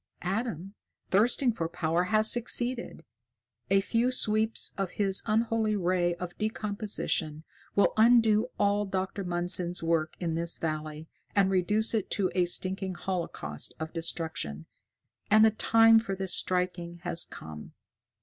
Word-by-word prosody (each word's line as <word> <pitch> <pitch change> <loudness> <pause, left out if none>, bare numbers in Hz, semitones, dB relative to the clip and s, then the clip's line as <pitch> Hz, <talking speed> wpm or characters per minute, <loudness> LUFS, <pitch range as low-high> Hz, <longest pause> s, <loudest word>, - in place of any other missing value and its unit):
Adam, 195 -1 -3 0.4
thirsting 235 +5 +3
for 165 -7 -3
power, 170 +1 -1
has 215 +2 +3
succeeded. 240 +1 -3 0.6
A 195 0 +4
few 230 +5 0
sweeps 220 -2 0
of 195 -2 -3
his 195 -2 0
unholy 220 0 +1
ray 175 -2 0
of 175 0 -7
decomposition 205 -7 -2 0.3
will 200 - +3
undo 225 -1 +4
all 205 0 +1
Dr. 190 +1 -3
Mundson's 175 0 +2
work 165 -1 0
in 170 -3 -2
this 170 +1 -3
valley 155 0 -4 0.3
and 195 -1 +3
reduce 210 +5 +2
it 215 -4 -1
to 190 -3 0
a 180 -1 +2
stinking 185 +1 -1
holocaust 170 - -3
of 160 0 -6
destruction. 160 - -3 0.6
And 215 +1 +6
the 220 - +4
time 225 +1 +5
for 195 -4 -4
his 190 -1 -2
striking 180 -1 0
has 175 -2 +2
come!" 75 -1 -10
190 Hz, 135 wpm, -28 LUFS, 170-215 Hz, 0.6 s, And